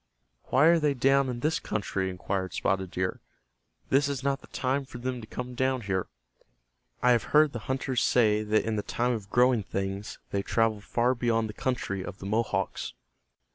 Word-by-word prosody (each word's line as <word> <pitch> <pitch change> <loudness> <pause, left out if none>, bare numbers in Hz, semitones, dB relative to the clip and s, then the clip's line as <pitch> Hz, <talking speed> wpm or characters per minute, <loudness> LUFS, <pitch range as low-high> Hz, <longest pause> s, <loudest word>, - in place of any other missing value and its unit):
"Why 135 +4 +4
are 170 +1 +6
they 150 -2 +1
down 135 +1 +3
in 120 -1 -4
this 155 +3 +1
country?" 100 -3 -2
inquired 95 +1 -3
Spotted 95 -2 0
Deer. 90 +1 -2 0.7
"This 140 +2 +3
is 135 -2 -3
not 140 0 0
the - - -15
time 135 +2 -1
for 130 - -10
them 125 0 -3
to 110 - -10
come 125 +2 -6
down 130 0 0
here. 95 -3 -1 1.0
I 125 - +6
have 120 -2 +3
heard 150 -2 +5
the 120 - -3
hunters 130 -1 0
say 105 -3 +3
that 110 0 +1
in 110 -1 -1
the - - 0
time 120 +4 -1
of 105 -5 -4
growing 125 -1 +4
things 95 +1 -4
they 100 - 0
travel 110 0 +1
far 120 +4 +1
beyond 115 -2 0
the - - -6
country 105 -6 -2
of 95 - -7
the 95 - -9
Mohawks." 100 -2 -1
120 Hz, 190 wpm, -28 LUFS, 100-130 Hz, 1.0 s, are